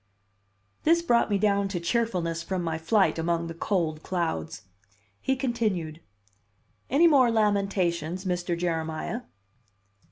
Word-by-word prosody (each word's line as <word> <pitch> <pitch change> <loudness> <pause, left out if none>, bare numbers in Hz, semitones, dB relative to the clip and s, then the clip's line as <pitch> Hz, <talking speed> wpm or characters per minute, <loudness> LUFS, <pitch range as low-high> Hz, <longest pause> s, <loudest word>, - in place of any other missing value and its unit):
This 335 +2 +3
brought 235 -9 +3
me 205 - +2
down 200 -1 +2
to 195 -3 -3
cheerfulness 170 -3 -1
from 185 +1 -3
my 160 -1 -2
flight 190 +2 +2
among 170 0 0
the 165 - -5
cold 165 -3 -1
clouds. 165 - -3 0.6
He 265 - +1
continued: 215 - -2 0.9
"Any 285 +7 +4
more 275 -7 +6
lamentations, 195 -5 0
Mr. 175 -1 -1
Jeremiah?" 165 +5 -2
180 Hz, 120 wpm, -27 LUFS, 165-220 Hz, 0.9 s, more